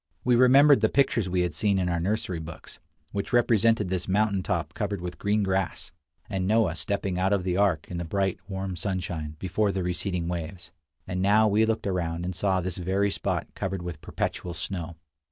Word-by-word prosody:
We 125 -1 +4
remembered 135 +1 +6
the 110 - +4
pictures 115 -8 +2
we 90 0 +1
had 90 -3 -1
seen 100 +5 +1
in 90 -1 0
our 85 -1 0
nursery 95 -1 -1
books, 80 +1 -10 0.3
which 100 - -3
represented 115 -4 +3
this 90 -1 -2
mountain 100 0 +2
top - - -2
covered 100 - -2
with 90 0 -6
green 105 +1 +1
grass, 95 -1 -1 0.4
and 95 -2 -2
Noah 110 -5 +3
stepping 95 +1 -2
out 95 +2 +2
of 100 -3 +1
the 90 -1 -1
ark, 95 -6 +2
in 90 - -3
the - - -2
bright, 95 +2 -1
warm 95 -1 -4
sunshine, 85 -5 -3
before 100 +4 0
the 95 -1 -2
receding 90 0 -2
waves; 85 +1 -5 0.3
and 90 0 -3
now 105 +3 +5
we 110 +2 +3
looked 110 0 -1
around 85 -3 -2
and 90 0 -3
saw 95 0 +1
this 90 -1 -4
very 95 +3 0
spot - - -1
covered 95 -2 -3
with 85 -4 -6
perpetual 85 -1 -3
snow. 85 0 -5
95 Hz, 195 wpm, -27 LUFS, 90-105 Hz, 0.4 s, remembered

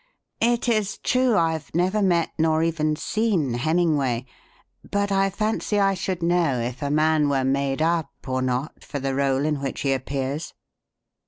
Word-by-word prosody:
It 235 +1 +2
is 215 -4 +1
true 255 -3 +2
I've 160 -3 -1
never 185 +5 +2
met 175 -4 +2
nor 160 0 +2
even 155 -2 0
seen 190 - 0
Hemmingway, 140 -3 +1 0.6
but 200 0 0
I 195 0 +3
fancy 215 +1 -1
I 195 -1 +3
should 185 -2 -3
know 170 -7 +2
if 120 +3 -4
a 140 - -1
man 155 0 +3
were 135 -2 +1
made 135 +2 0
up 165 -3 +1 0.2
or 130 0 -1
not 130 +3 -2
for 145 - -5
the 135 0 -2
rôle 135 +1 +1
in 150 -2 -1
which 135 -1 -4
he 135 -1 +1
appears. 135 +3 -3
155 Hz, 165 wpm, -24 LUFS, 135-190 Hz, 0.6 s, I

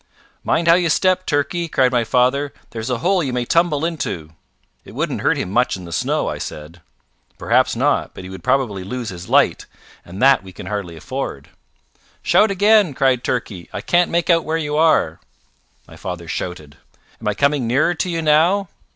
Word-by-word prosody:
"Mind 165 +1 0
how 165 - +8
you 175 -1 +2
step, 185 +3 +2
Turkey," 165 +4 0
cried 130 -5 +2
my 120 -2 +2
father. 130 +5 +1 0.2
"There's 115 +1 -5
a 125 - 0
hole 190 0 +3
you 135 - -2
may 125 -1 -2
tumble 165 0 +2
into." 90 - -4 0.5
"It - - -14
wouldn't - - -2
hurt - - +2
him 90 - -3
much 120 -1 +1
in 90 - -10
the 85 - -10
snow," - - -1
I - - -4
said. 75 +3 -8 0.6
"Perhaps - - +2
not, - - 0
but - - -9
he 95 - -9
would 95 -3 -10
probably 105 -8 0
lose 120 +3 -5
his 90 -1 -9
light, - - +2 0.4
and 90 +3 -10
that 135 +1 +5
we 95 -1 -13
can - - -9
hardly 95 -4 -4
afford." - - -6 0.7
"Shout 215 - +4
again," 200 -4 +3
cried 130 -2 +2
Turkey. 100 -8 -3
"I - - -5
can't 175 0 +2
make 170 +1 +1
out 165 -1 +3
where 160 +1 -1
you 150 -2 -3
are." 155 - +2 0.7
My - - -14
father 90 -2 -6
shouted. 80 -4 -6 0.4
"Am 110 - -5
I 105 - 0
coming 140 0 +1
nearer 135 +8 +2
to 180 - -2
you 165 -1 -2
now?" 170 +6 +3
130 Hz, 195 wpm, -20 LUFS, -, 0.7 s, how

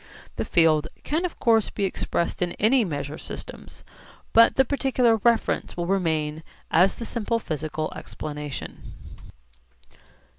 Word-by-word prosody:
The - - -1
field 160 -3 +3 0.2
can 320 +5 -1
of 355 - -5
course 225 -2 +3
be 205 - -4
expressed 170 -2 -2
in 175 -1 0
any 235 +4 +3
measure 150 -4 -4
systems, - - -9 0.5
but 230 0 +6
the 265 - +4
particular 255 -4 +2
reference 230 -3 +1
will 175 - -1
remain 160 -5 0 0.3
as 180 +4 +4
the 230 - -6
simple 230 0 -1
physical 155 -5 -4
explanation. 150 -2 -7
190 Hz, 125 wpm, -25 LUFS, 155-230 Hz, 0.5 s, but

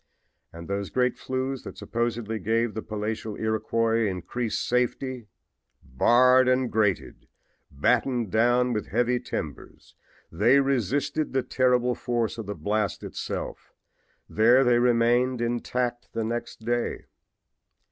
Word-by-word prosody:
And 85 0 -10
those 100 0 -3
great 125 -1 +1
flues 130 0 -3
that - - -10
supposedly 115 -1 -2
gave 115 +1 0
the 110 - -4
palatial 110 0 -4
Iroquois 110 +1 0
increased 105 +5 -3
safety! 125 -1 -1 0.6
Barred 125 - +4
and 130 -1 +2
grated, 105 -4 -1 0.4
battened 120 - 0
down 120 +2 +3
with 105 - -3
heavy 120 +3 +1
timbers 80 - -7 0.4
they 115 +11 +4
resisted 140 +3 0
the 130 -1 +1
terrific 125 -1 +1
force 120 -2 -2
of 110 - -6
the 105 - -4
blast 105 +5 -2
itself. - - -6 0.5
There 120 +5 +4
they 120 -1 +4
remained 120 +1 +2
intact 120 +1 -2
the 115 - -1
next 120 +1 -4
day. 120 0 -1
120 Hz, 120 wpm, -26 LUFS, 110-125 Hz, 0.6 s, Barred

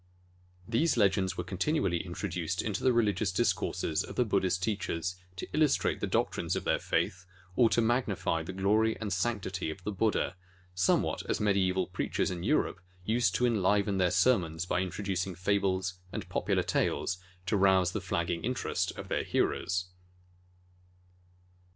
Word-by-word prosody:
These 125 +6 +2
legends 95 -3 +2
were - - -2
continually 95 - 0
introduced 90 -1 -3
into 105 -3 -2
the 130 - +5
religious 105 -4 +1
discourses 80 -3 0
of - - -9
the 125 - +2
Buddhist 95 -3 +1
teachers 90 -4 -2 0.2
to 95 - -6
illus 155 -2 +4
trate - - -1
the - - -2
doctrines - - 0
of - - -2
their - - +1
faith 95 +1 -1 0.3
or 120 -3 +5
to 120 - +2
magnify 105 -9 0
the 80 - -6
glory 105 +4 +2
and 105 -3 -2
sanctity 95 -3 -1
of 90 +4 -7
the 105 - -2
Buddha, 105 -1 0 0.4
somewhat 90 0 +1
as - - 0
medi 100 -3 +2
eval 95 0 0
preachers - - -1
in 90 -2 -4
Europe 105 - +1 0.2
used 115 +3 +2
to 125 - +2
enliven 100 -3 +2
their 90 -1 +4
sermons 85 -6 +2
by 90 - 0
introducing 95 0 -2
fables 95 0 0
and - - -5
popular - - 0
tales 95 - 0 0.3
to 105 - +1
rouse 95 -2 +4
the 110 - -3
flagging 85 -2 -2
interest 125 +2 -1
of - - -7
their - - -1
hearers. 90 -1 0
95 Hz, 155 wpm, -30 LUFS, 90-110 Hz, 0.4 s, the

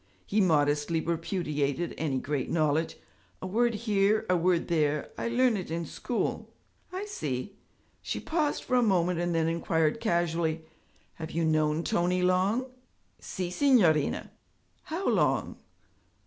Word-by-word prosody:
He 210 +1 +1
modestly 150 -2 +2
repudiated 165 -2 -2
any 145 -4 -1
great 140 +1 -2
knowledge. 155 0 +1 0.4
'A - - -6
word 235 +5 +1
here, 210 -1 +1
a - - +4
word 175 0 +1
there; 150 -3 0
I - - -3
learn 240 0 +3
it 185 -5 -4
in 165 +1 -3
school.' 235 +9 -3 0.4
'I 375 +3 -4
see!' 155 - -4 0.5
She - - -3
paused 315 -3 -1
for 255 - -5
a 250 - +5
moment 180 -5 +2
and 175 -1 -1
then 160 -1 +2
inquired 165 +2 0
casually, 170 -5 0 0.5
'Have 160 -1 -6
you 165 0 -1
known 155 0 +1
Tony 180 +2 +1
long?' 190 +7 +2 0.5
'Si, 180 -2 -4
signorina.' 180 - +3 0.5
'How 345 +5 -3
long?' - - +1
170 Hz, 135 wpm, -28 LUFS, 160-210 Hz, 0.5 s, a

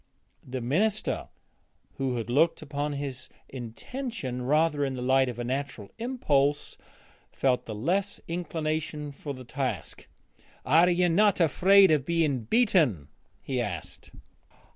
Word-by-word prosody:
The 130 0 -5
minister, 200 - 0 0.7
who 130 -2 -1
had 115 -2 -3
looked 155 +7 +2
upon 145 0 -3
his 140 -2 -5 0.2
intention 130 - -6
rather 150 +3 +2
in 135 -1 -1
the 125 - -5
light 130 0 +3
of 120 - -6
natural 125 -3 -4
impulse, 145 - 0 0.6
felt 130 -2 0
the 110 - -5
less 185 - -1
inclination 155 -3 -3
for 140 0 -7
the 130 0 -10
task. 130 - -4 0.6
'Are 165 +6 +5
you 180 0 +3
not 200 +4 +3
afraid 190 +3 +5
of 150 -4 +3
being 155 -8 +1
beaten?' 155 - +2 0.3
he - - -1
asked. - - -6
145 Hz, 125 wpm, -27 LUFS, 130-170 Hz, 0.7 s, Are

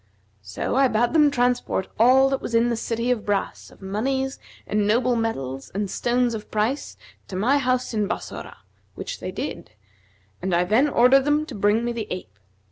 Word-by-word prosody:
So 100 - -4
I 270 0 +5
bade 235 +2 +1
them 300 -2 +5
transport 245 -7 0
all 260 +4 +6
that 270 - -1
was 230 - -3
in 230 +1 +3
the 235 - 0
City 230 +2 -1
of 230 -4 -1
Brass 205 -1 -2
of - - -18
monies 265 +7 -2 0.3
and 210 -1 0
noble 240 +3 +2
metals 135 - -3
and 200 -1 -2
stones 245 0 +1
of 215 -1 -7
price 220 +7 -2 0.3
to 190 - -7
my 250 +10 +2
house 255 -2 0
in 210 -2 0
Bassorah, - - -6 0.4
which - - -6
they - - -5
did; 110 - -6 0.7
and 185 -1 0
I 175 - +3
then 225 +11 +3
ordered 260 +1 +5
them 295 +1 +2
to 290 - -9
bring 210 +2 +1
me 240 - -1
the 230 -2 -4
ape. 100 - -7
235 Hz, 190 wpm, -23 LUFS, 205-255 Hz, 0.7 s, all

